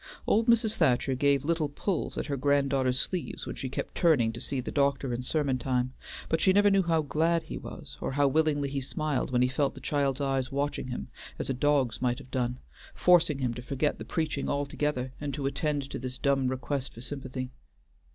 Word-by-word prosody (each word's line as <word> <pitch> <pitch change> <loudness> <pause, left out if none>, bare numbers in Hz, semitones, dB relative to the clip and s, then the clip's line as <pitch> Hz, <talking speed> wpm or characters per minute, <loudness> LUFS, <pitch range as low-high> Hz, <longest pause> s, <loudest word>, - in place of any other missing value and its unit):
Old 225 +3 +3
Mrs. 225 -2 +3
Thacher 135 -4 +3
gave 140 +1 +2
little 165 -2 +1
pulls 175 +5 -2
at - - -1
her 140 - -2
granddaughter's 135 -2 +2
sleeves 180 +3 -3
when - - -5
she 130 - -4
kept - - -4
turning 130 -10 +3
to 115 - -6
see 135 - -2
the 125 - -4
doctor 140 -2 +1
in 120 - -2
sermon 135 -1 0
time, 125 0 0 0.3
but 160 - +1
she 190 - +5
never 205 +1 +5
knew 195 0 +5
how 165 -3 +1
glad 165 +3 +1
he - - -7
was, - - -9
or - - -2
how 145 0 +3
willingly 145 0 +2
he 140 0 -2
smiled 150 +1 -1
when 125 -1 +3
he - - +4
felt 135 +2 0
the - - -8
child's 140 -2 0
eyes 135 -2 0
watching 140 -1 -1
him 125 - -5 0.3
as - - -2
a - - +1
dog's 130 -4 +1
might 125 -1 +1
have 130 -2 -12
done, 125 -1 -1 0.4
forcing 170 -5 +4
him 125 -3 -1
to 125 - -6
forget 140 +4 -1
the - - -5
preaching 155 -4 -2
altogether 140 -2 -1
and 145 -2 -3
to 140 -2 -3
attend 140 0 -1
to - - -5
this 130 0 -5
dumb 135 -2 +2
request 130 +1 -3
for 115 - -9
sympathy. 130 -1 -4
140 Hz, 210 wpm, -29 LUFS, 130-150 Hz, 0.4 s, she